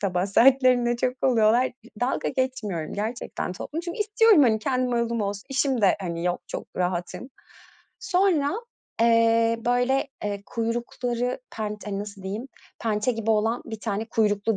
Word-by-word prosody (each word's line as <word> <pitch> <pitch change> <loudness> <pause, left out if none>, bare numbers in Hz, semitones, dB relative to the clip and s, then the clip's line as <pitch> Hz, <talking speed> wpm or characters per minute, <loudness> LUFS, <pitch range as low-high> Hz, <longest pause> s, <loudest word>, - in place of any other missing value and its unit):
sabah 185 -2 0
saatlerinde 245 +2 +4
çok 250 +1 0
oluyorlar, 235 0 +4
d - - -19 0.3
dalga 250 +2 0
geçmiyorum 230 - -2
gerçekten 215 -3 -4
topladım 295 - -5
çünkü 345 +3 -5
istiyorum, 425 -5 +5
hani, 220 -4 +4
kendi 255 +2 0
marulum 235 -1 0
olsun, 200 0 -3
işim 265 -1 +1
de, 200 -3 +4
hani, 170 -2 -4
yok, 180 0 0
çok - - -6
rahatım. 180 +7 -3 0.7
Sonra, 360 -9 +2 0.5
eee, 230 0 +4
böyle, 245 +3 +2 0.2
eee, 200 -1 -3
kuyrukları 240 +2 -2 0.2
penç 210 -1 -4
hani, 200 -1 -3
nasıl 200 -1 -7
diyeyim 210 +8 -5 0.3
pençe 220 +2 0
gibi 225 -1 -2
olan 225 +2 +1
bir 220 -1 -7
tane 215 -1 -2
kuyruklu 210 -1 +1
230 Hz, 150 wpm, -25 LUFS, 205-255 Hz, 0.7 s, istiyorum